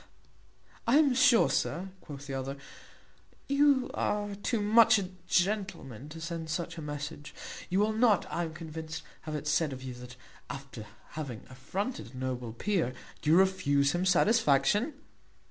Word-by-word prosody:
"I 245 +5 +6
am 295 -4 +5
sure, 250 -2 +6
sir," 185 +3 -1
quoth 140 -2 -9
the 140 - -6
other, 135 +1 -3 0.9
"you 280 -2 +3
are 205 0 -1
too 205 +3 -1
much 220 +1 +6
a 190 -3 -2 0.2
gentleman 180 - -1
to 165 +2 -9
send 165 -1 -5
such 170 +1 -3
a 165 - -6
message; 145 0 -6 0.3
you 185 - +2
will 215 +1 +2
not, 220 -3 +4
I 170 - -1
am 160 -1 -8
convinced, 160 -1 -6 0.3
have 155 - -3
it 150 0 -4
said 150 0 +2
of 130 0 -8
you, 130 -1 -5
that, 125 +1 -10 0.3
after 135 -6 -8 0.2
having 135 -8 -6
affronted 140 - -4
a - - -8
noble 125 -2 -3
peer, 130 - -1 0.3
you 155 +3 +4
refuse 145 -7 +3
him 175 +3 0
satisfaction. 205 - +3
165 Hz, 155 wpm, -30 LUFS, 140-205 Hz, 0.9 s, I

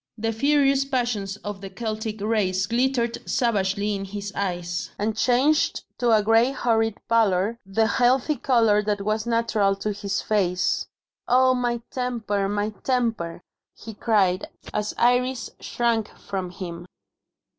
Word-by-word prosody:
The 225 +1 -1
furious 275 +2 +3
passions 240 -7 -2
of 205 -1 -5
the 195 - -7
Celtic 220 0 -4
race 200 -3 +1
glittered 240 +1 0
savagely 205 -4 +1
in 195 -1 -3
his 200 0 -6
eyes, 175 -3 -3
and 215 +1 -1
changed 260 +7 +2 0.2
to 240 -1 +2
a 215 -2 +4
grey 225 +3 +4
horrid 225 -5 +1
pallor 220 -1 +2
the 220 +3 +2
healthy 255 +5 +2
colour 225 -5 +3
that 205 -1 -1
was 215 +2 -1
natural 230 -4 +2
to 210 +2 -3
his 200 -1 -2
face. 185 -4 0 0.4
"Oh, 255 +1 +5
my 240 -2 -1
temper, 220 -6 -1
my 205 +1 -1
temper!" 225 -10 -1 0.3
he 225 - -9
cried, 200 -4 +1 0.3
as 210 0 -2
Iris 245 +1 +1
shrank 230 -3 0
from 190 -2 -4
him. 175 -1 -7
220 Hz, 135 wpm, -24 LUFS, 200-240 Hz, 0.4 s, Oh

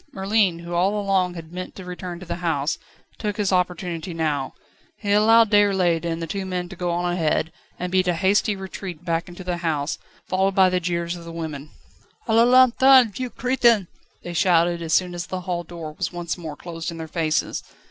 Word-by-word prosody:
Merlin, 195 -2 +2
who 170 +1 -8
all 190 +4 +2
along 190 -3 +1
had 165 -1 -9
meant 185 0 -6
to 190 - -9
return 180 -1 -6
to 185 - -10
the 170 0 -4
house, 160 -4 -1 0.4
took 210 -2 -3
his 205 -2 0
opportunity 180 -1 -1
now. 150 -4 -1 0.4
He 205 -2 -3
allowed 220 +1 +5
Déroulède 190 -5 +3
and 165 -1 -2
the 165 - -3
two 195 +4 -4
men 180 -2 -3
to 190 - -9
go 175 0 -2
on 175 +1 0
ahead, 160 -1 0 0.3
and 180 0 -4
beat 185 0 +2
a 175 - +2
hasty 200 +5 +2
retreat 190 -3 -7
back 165 0 -1
into 175 +2 -9
the 180 -1 -2
house, 155 -4 -2 0.3
followed 190 +1 +1
by 190 -1 +5
the 180 - +2
jeers 170 0 -2
of 170 - -10
the 170 - -8
women. 155 -3 -6 0.6
"A 225 - +1
la 230 +1 +6
lanterne, 255 -1 +6
vieux 255 +5 -4
crétin!" 240 -5 +2 0.4
they 175 - -6
shouted 170 -1 +3
as 165 -1 -4
soon 180 0 +2
as 175 0 -5
the 185 -1 -4
hall 175 -1 -3
door 165 -2 -8
was - - -3
once 175 -2 -3
more 160 -4 -7
closed 165 +1 -6
in 165 - -7
their 160 -1 -6
faces. 155 -1 -1
180 Hz, 210 wpm, -23 LUFS, 170-195 Hz, 0.6 s, la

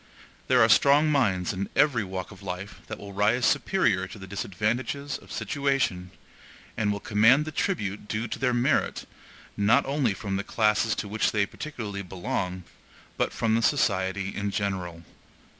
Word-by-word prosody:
There 125 -2 +5
are - - +6
strong 145 +6 +5
minds 100 - +1
in 100 +1 -4
every 140 -7 +3
walk 95 -1 -5
of - - -13
life 95 +1 -6
that 110 - -6
will 100 -1 -10
rise 110 +5 +2
superior 105 - +2
to 105 - -10
the 95 - -9
disadvantages 110 +9 -2
of - - -16
situation, 135 -11 -1 0.7
and 105 -2 0
will 100 - -2
command 115 +9 +4
the 155 - -5
tribute 105 - -2
due 110 +3 -2
to - - -5
their 125 -1 +2
merit, 120 0 +1 0.5
not 100 +2 +3
only 135 -7 0
from 95 0 -3
the 100 - -2
classes 110 +1 +1
to - - -4
which 110 +2 0
they 105 -2 +2
particularly 105 -6 -6
belong, 90 0 -4 0.5
but - - 0
from 110 -1 0
the 115 - +2
society 95 -7 +1
in 100 0 -2
general. 95 -4 -3
105 Hz, 165 wpm, -26 LUFS, 95-125 Hz, 0.7 s, are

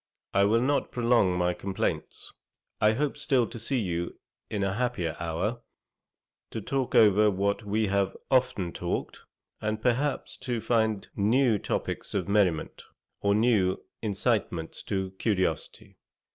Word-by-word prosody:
I 100 0 +4
will 115 +3 +3
not 140 +3 +1
prolong 115 -7 +3
my 90 0 +1
complaints. 95 +1 -3 0.5
I 105 +1 +5
hope 145 +5 -1
still 135 -4 +2
to 115 +1 -8
see 130 +4 -1
you 85 -6 -2 0.3
in 105 -2 -1
a 95 -1 0
happier 105 -8 -1
hour, 85 +8 -2 0.9
to - - -4
talk 130 +4 -2
over 105 0 +6
what 100 +2 0
we 110 +2 +1
have 100 -1 0
often 125 -9 +2
talked, - - -3 0.4
and 110 0 -1
perhaps 130 +5 0
to 125 -2 -3
find 110 -2 +1
new 110 +2 +3
topicks - - -3
of - - -1
merriment, 100 -6 +1 0.4
or 100 0 +2
new 105 -5 +3 0.2
incitements 100 -6 -1
to 95 -2 -2
curiosity. 95 -8 -2
105 Hz, 135 wpm, -28 LUFS, 95-120 Hz, 0.9 s, over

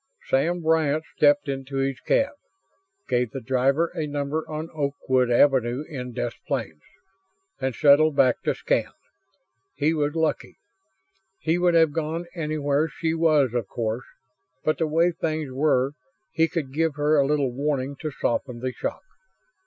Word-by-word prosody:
Sam 170 +6 +1
Bryant 155 -1 +2
stepped 145 0 +4
into 135 0 -4
his 135 -1 -1
cab, 275 - +1 0.8
gave 125 -2 +1
the 135 - -6
driver 135 +6 +1
a 160 -4 -3
number 145 +2 -3
on 155 +1 -5
Oakwood 140 -4 0
Avenue 125 +1 +3
in 125 -4 -6
Des 120 0 -2 0.2
Plaines, 110 - -3 0.8
and 130 -2 -2
settled 150 +1 +5
back 130 -3 +3
to - - 0
scan. - - 0 0.9
He 150 +3 +1
was 150 -1 -1
lucky. 160 -1 -1 0.8
He 165 +2 0
would 175 -1 +3
have 160 -2 +5
gone 165 +2 -2
anywhere 150 -2 0
she 160 +2 -2
was, 155 -6 +3
of 120 -5 -1
course, 115 +3 -3 0.6
but 155 - 0
the 160 - +1
way 165 +3 +3
things 155 -4 -3
were, 135 -1 +2 0.4
he 165 0 +2
could 150 -6 -4
give 160 0 0
her 150 +1 +2
a 135 - +3
little 145 -3 +1
warning 140 +1 -2
to 155 - -4
soften 125 -2 -2
the 130 +1 -2
shock. - - -4
145 Hz, 155 wpm, -25 LUFS, 130-160 Hz, 0.9 s, settled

